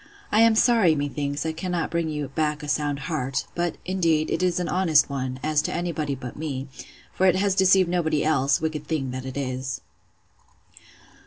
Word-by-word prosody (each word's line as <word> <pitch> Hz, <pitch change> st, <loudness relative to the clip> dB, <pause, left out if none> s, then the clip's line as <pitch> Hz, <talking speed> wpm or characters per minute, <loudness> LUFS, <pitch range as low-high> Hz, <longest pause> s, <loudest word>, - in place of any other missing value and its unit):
I 210 Hz, -, +3 dB
am 225 Hz, 0 st, +6 dB
sorry, 220 Hz, -8 st, +4 dB
methinks, 145 Hz, 0 st, -2 dB
I 160 Hz, -, 0 dB
cannot 175 Hz, +1 st, -3 dB
bring 170 Hz, -1 st, -1 dB
you 150 Hz, -3 st, -3 dB
back 150 Hz, +1 st, -1 dB
a -, -, -6 dB
sound 145 Hz, -1 st, -1 dB
heart; 135 Hz, -3 st, -2 dB
but, 175 Hz, -1 st, -2 dB
indeed, 165 Hz, -4 st, +1 dB
it -, -, 0 dB
is 180 Hz, -1 st, +1 dB
an 180 Hz, -, -2 dB
honest 160 Hz, -6 st, +3 dB
one, 130 Hz, -1 st, -3 dB
as 155 Hz, -1 st, +2 dB
to -, -, -3 dB
any 175 Hz, 0 st, -1 dB
body 150 Hz, -3 st, -2 dB
but 125 Hz, -2 st, -8 dB
me; 140 Hz, -3 st, -4 dB, 0.5 s
for 190 Hz, -, +2 dB
it 185 Hz, -, +4 dB
has 195 Hz, +1 st, +2 dB
deceived 190 Hz, -1 st, +4 dB
nobody 160 Hz, -4 st, +1 dB
else: 140 Hz, -3 st, +2 dB
Wicked 155 Hz, -2 st, -3 dB
thing 140 Hz, -5 st, -2 dB
that 130 Hz, +1 st, -5 dB
it 130 Hz, -, -6 dB
is! 130 Hz, -1 st, -3 dB
155 Hz, 190 wpm, -24 LUFS, 140-175 Hz, 0.5 s, am